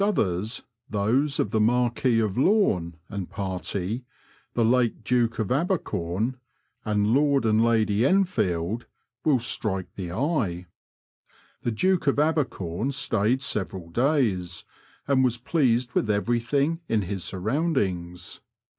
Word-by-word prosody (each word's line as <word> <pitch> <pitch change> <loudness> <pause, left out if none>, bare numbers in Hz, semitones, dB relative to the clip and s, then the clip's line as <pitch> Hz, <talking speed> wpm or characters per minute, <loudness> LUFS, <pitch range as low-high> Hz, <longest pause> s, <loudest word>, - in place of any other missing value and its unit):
7B 200 - +3
others 105 - -1 0.3
those 125 +8 +1
of 105 - 0
the 110 - +2
Marquis 120 +1 +2
of 105 -4 0
Lome 125 - +2
and 100 -4 -5
party, 95 +4 -3 0.5
the 115 - +3
late 120 -1 +2
Doke 120 0 +1
of 110 -1 -2
Abercom, 125 - -1 0.5
and 105 +1 +1
Lord 140 -2 +3
and 110 0 +3
Lady 110 -2 +2
Enfield 115 - +1 0.4
will 150 -4 +4
strike 105 -5 -1
the 90 -3 -6
eye. 110 - -1 1.0
The 120 - -1
Duke 180 - +1
of 140 - +3
Abercom 135 - 0
stayed 130 -1 +1
several 90 -6 -3
days, 110 - 0 0.4
and 135 -2 +3
was 120 -2 +2
pleased 125 -2 +1
with 110 - 0
everything 120 +9 +1
in 110 -2 +2
his 95 -1 -4
surroundings. 95 - -2
115 Hz, 125 wpm, -26 LUFS, 95-135 Hz, 1.0 s, will